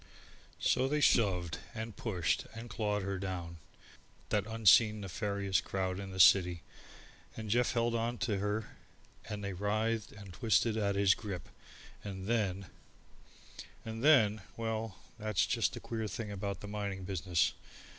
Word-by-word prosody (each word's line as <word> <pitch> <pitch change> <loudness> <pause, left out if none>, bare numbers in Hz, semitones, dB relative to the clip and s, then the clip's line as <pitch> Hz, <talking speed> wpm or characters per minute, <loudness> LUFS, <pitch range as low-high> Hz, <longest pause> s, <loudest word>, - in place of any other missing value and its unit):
So 130 - +2
they 150 +2 +1
shoved 90 - +2 0.2
and 110 -1 -5
pushed 90 -8 -1
and 115 0 -8
clawed 105 -2 -1
her 100 -1 -3
down 90 -3 -5 0.7
that - - +1
unseen 110 -1 +5
nefarious 100 0 -1
crowd 95 -1 -2
in 100 -1 -6
the 95 0 -7
city 90 -2 +6 0.7
and 110 -2 -4
Jeff 120 +2 +2
held 120 -1 +1
on 115 +1 -1
to 105 -4 0
her 105 +2 -2 0.5
and 105 -1 -4
they 100 -1 -3
writhed 110 +3 -1
and 100 -3 -11
twisted 110 +2 +2
at 100 -2 0
his 100 -1 +5
grip, 100 -5 -6 0.5
and 95 -2 -6
then 100 -4 0 1.2
And 110 +1 -5
then 110 -9 +5 0.2
well, 110 -3 -3 0.2
that's 105 -4 +1
just - - +1
the - - -5
queer 110 -1 -4
thing 105 0 -5
about 100 0 -4
the 105 - -7
mining 100 -2 -4
business. 90 -2 0
105 Hz, 145 wpm, -33 LUFS, 95-110 Hz, 1.2 s, city